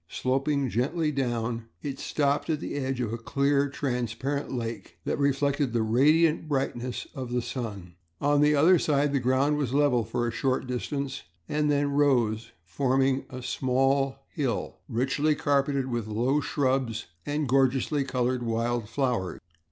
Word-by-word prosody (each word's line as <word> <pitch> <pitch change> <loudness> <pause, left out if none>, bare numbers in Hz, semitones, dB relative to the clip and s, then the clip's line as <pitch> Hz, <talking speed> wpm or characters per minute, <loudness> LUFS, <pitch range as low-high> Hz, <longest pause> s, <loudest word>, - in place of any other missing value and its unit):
Sloping 135 +2 0
gently 150 +7 0
down, 120 -4 -2 0.2
it 140 -2 -4
stopped 145 +1 0
at 155 -2 +1
the - - -5
edge 135 -2 -2
of 115 -2 -2
a 115 - -3
clear, 140 +3 +1
transparent 135 +1 -2
lake 115 -3 -5
that - - -1
reflected 140 -1 +1
the 115 -2 +2
radiant 150 +8 +3
brightness 130 -3 -2
of 130 -2 -6
the 125 - +1
sun. 105 -8 -5 0.3
On 145 0 +3
the 150 0 +5
other 165 +5 +5
side 145 -1 +1
the 140 - +2
ground 130 +4 +2
was 135 -3 -1
level 140 -5 +3
for 120 +2 -2
a - - -1
short 130 +3 0
distance 135 +2 -3 0.3
and 150 0 0
then 145 0 +2
rose 120 -6 +2
forming 135 +7 +1
a 130 -1 -7
small 135 +2 +1 0.2
hill, 130 -8 -2
richly 135 +5 +1
carpeted 140 -2 +1
with 120 -4 -3
low 120 +7 +1
shrubs 130 -6 0 0.2
and 145 0 -1
gorgeously 135 +2 +2
colored 125 -1 -1
wild 115 -1 -1
flowers. 115 -8 -1
135 Hz, 150 wpm, -27 LUFS, 120-145 Hz, 0.3 s, the